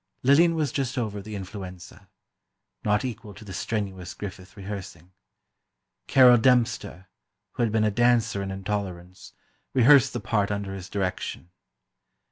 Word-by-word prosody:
Lillian 165 +6 +5
was 150 -5 0
just 135 -1 -2
over 105 -4 -2
the 105 +1 -8
influenza—not 95 +2 -7
equal 115 -4 -7
to 110 - -12
the 95 - -8
strenuous 95 -2 -4
Griffith 95 0 -9
rehearsing. 95 -3 -8 1.0
Carol 125 -3 +7
Dempster, 115 -6 +1 0.4
who - - -4
had 115 -2 +1
been 110 0 +2
a 105 - +2
dancer 115 -2 +2
in 100 - -4
"Intolerance," 95 -2 -5 0.4
rehearsed 135 +1 +6
the 120 - -2
part 105 -1 0
under 100 -1 -3
his 95 -2 -8
direction. 90 -2 -4
105 Hz, 130 wpm, -26 LUFS, 95-120 Hz, 1.0 s, Carol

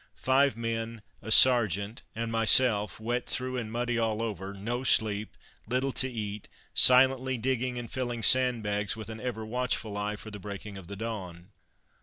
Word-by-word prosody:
Five 130 -2 +1
men, 115 -1 -5 0.2
a 110 - -9
sergeant 110 -3 +4
and 115 0 -4
myself, 115 -2 +4
wet 120 +3 -3
through 130 0 -2
and 110 -3 -5
muddy 120 0 -2
all 110 -1 -1
over; 100 -3 -5
no 115 +6 -5
sleep, 110 -4 +2 0.3
little 130 +2 -1
to 130 0 -1
eat, 105 -4 -6 0.2
silently 130 0 +5
digging 125 +1 -2
and 120 - -5
filling 120 -3 -4
sandbags 110 -6 +3
with 110 0 -9
an 110 0 -8
ever 115 -3 -5
watchful 115 -2 -3
eye 105 +1 -3
for 110 +1 -11
the 105 - -8
breaking 100 +1 -9
of 95 -3 -11
the 100 - -8
dawn. 95 -4 -7
115 Hz, 165 wpm, -28 LUFS, 105-125 Hz, 0.3 s, silently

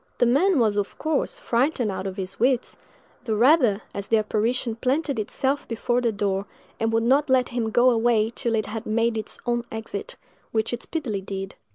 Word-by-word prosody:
The - - +3
man 315 +9 +3
was, 215 -4 +2
of 205 -1 -2
course, 315 +10 -1
frightened 250 - 0
out 190 0 -4
of 190 - -6
his 190 0 -5
wits—the 245 -2 -2
rather, 240 -4 +4
as 200 0 -4
the 225 - +3
apparition 225 +2 0
planted 270 +1 0
itself 265 +6 -1
before 240 +2 0
the 235 -2 +1
door, 200 -1 -1 0.3
and 225 0 +1
would 225 0 +2
not 275 +5 +3
let 260 -1 +3
him 235 -2 -1
go 245 +3 +4
away 225 -1 +2
till 235 -1 -1
it 215 - 0
had 220 +2 -6
made 230 +1 +1
its 220 -1 -4
own 240 -1 0
exit, 220 -3 -6 0.4
which 220 +1 0
it 240 - -3
speedily 250 -12 -3
did. 195 0 -5
230 Hz, 190 wpm, -24 LUFS, 215-250 Hz, 0.4 s, rather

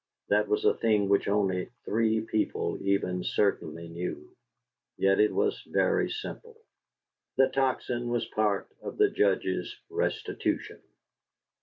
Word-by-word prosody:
That - - +3
was 420 0 0
a 435 - +6
thing 105 -3 +2
which 100 - +3
only 95 -3 +1 0.2
three 110 0 +2
people 110 -1 -1
even 90 -2 0
certainly 85 -5 0
knew; 85 +2 -6 0.6
yet 95 0 +3
it 105 - +5
was - - 0
very - - +2
simple. 465 -1 -7 0.8
The 135 - +5
Tocsin 130 -2 0
was 120 0 0
part 105 -2 0
of - - -7
the 415 -1 +4
Judge's - - 0 0.2
restitution. 435 +3 -2
105 Hz, 125 wpm, -29 LUFS, 95-125 Hz, 0.8 s, a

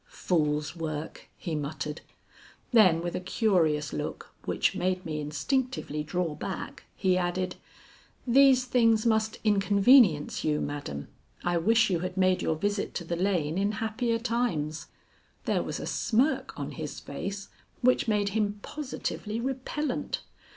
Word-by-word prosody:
"Fool's 155 - 0
work!" 155 -2 -5
he 170 - -5
muttered. 150 0 -4 0.7
Then 185 -9 +5
with 175 - -3
a - - -1
curious 170 -7 +1
look - - -5
which - - +1
made 185 0 -1
me 155 -2 -3
instinctively 200 - -1
draw 165 +1 -2
back, 185 +5 -6
he 185 -1 +2
added, 180 +1 -2 0.7
"These 260 0 +5
things 230 -3 +3
must 220 -1 +2
inconvenience 200 - +4
you, 150 -1 +1
madam. 105 - -5 0.3
I 175 0 +1
wish 225 +5 +3
you 175 - +1
had 185 +2 -4
made 185 -1 +3
your 160 - 0
visit 205 +5 -2
to 175 - -2
the 170 +1 -3
lane 175 -3 0
in 200 +2 +1
happier 225 +2 -1
times." 230 -11 -1 0.6
There - - +1
was - - -4
a - - -5
smirk 250 +7 0
on - - -4
his - - -6
face 200 0 -6 0.3
which 250 -1 +3
made 205 -2 +2
him 210 0 0
positively 250 -6 -4
repellent. 265 +2 -2
190 Hz, 140 wpm, -28 LUFS, 160-230 Hz, 0.7 s, Then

